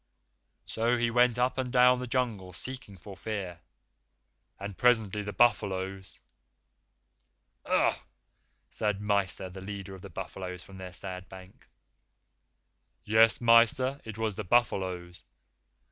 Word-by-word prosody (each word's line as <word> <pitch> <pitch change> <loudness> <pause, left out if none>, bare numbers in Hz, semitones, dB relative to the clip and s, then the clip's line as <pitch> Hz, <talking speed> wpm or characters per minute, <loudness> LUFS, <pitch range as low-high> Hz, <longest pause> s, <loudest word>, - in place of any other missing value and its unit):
So 115 +2 0
we 120 0 +1
went 120 0 +3
up 125 +2 +1
and 125 -1 -2
down 125 0 +5
the 125 - -5
Jungle 115 -7 -2
seeking 125 -1 -5
for 100 +2 -11
Fear, 95 -3 -5 1.0
and 100 0 -6
presently 110 -4 +2
the 105 0 -5
buffaloes 95 -4 0 0.7
" - - -38
"Ugh!" - - +3 0.8
said 105 -2 -1
Mysa, 100 -2 0
the 95 +1 -9
leader 100 0 -7
of 95 - -11
the 100 - -10
buffaloes, 90 0 -7
from 95 -1 -13
their 90 -1 -7
sand 95 0 -6
bank. 95 0 -14 1.4
"Yes, 110 +1 +4
Mysa, 120 +4 +4
it 110 -1 -8
was 110 -1 -1
the 105 - -5
buffaloes. 90 -5 0
105 Hz, 130 wpm, -29 LUFS, 95-120 Hz, 1.4 s, down